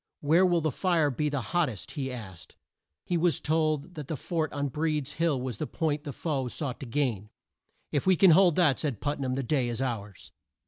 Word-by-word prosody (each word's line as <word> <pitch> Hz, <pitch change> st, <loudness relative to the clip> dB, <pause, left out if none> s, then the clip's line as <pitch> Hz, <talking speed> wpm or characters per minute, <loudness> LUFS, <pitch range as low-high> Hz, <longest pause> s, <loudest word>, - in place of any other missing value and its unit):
"Where 165 Hz, +6 st, +4 dB
will 175 Hz, -2 st, +2 dB
the 155 Hz, -1 st, 0 dB
fire 165 Hz, -1 st, +1 dB
be 150 Hz, +4 st, -1 dB
the 145 Hz, -2 st, -2 dB
hot 160 Hz, +10 st, +1 dB
test?" 105 Hz, -9 st, -7 dB
he 135 Hz, -2 st, -3 dB
asked. 95 Hz, -11 st, -9 dB, 0.5 s
He 175 Hz, -, 0 dB
was 165 Hz, -4 st, +2 dB
told 155 Hz, +1 st, 0 dB
that 150 Hz, -5 st, -7 dB
the 155 Hz, -, -3 dB
fort 160 Hz, +2 st, -2 dB
on 145 Hz, -1 st, -2 dB
Breed's 150 Hz, 0 st, -1 dB
Hill 165 Hz, -5 st, +1 dB
was 125 Hz, -4 st, -4 dB
the 155 Hz, -, -3 dB
point 155 Hz, -2 st, -2 dB
the 145 Hz, -, -4 dB
foe 135 Hz, -3 st, -2 dB
sought 130 Hz, +1 st, -4 dB
to 135 Hz, -, -7 dB
gain. 115 Hz, -6 st, -1 dB, 0.6 s
"If 145 Hz, +2 st, -1 dB
we 190 Hz, -, +6 dB
can 185 Hz, +1 st, +6 dB
hold 175 Hz, -1 st, +6 dB
that," 160 Hz, -7 st, +3 dB
said 140 Hz, -9 st, -2 dB
Put 145 Hz, 0 st, -2 dB
nam, 130 Hz, -2 st, -1 dB
"the 135 Hz, -, -2 dB
day 130 Hz, -2 st, 0 dB
is 120 Hz, -, -3 dB
ours." 110 Hz, -7 st, -4 dB
145 Hz, 220 wpm, -28 LUFS, 130-160 Hz, 0.6 s, we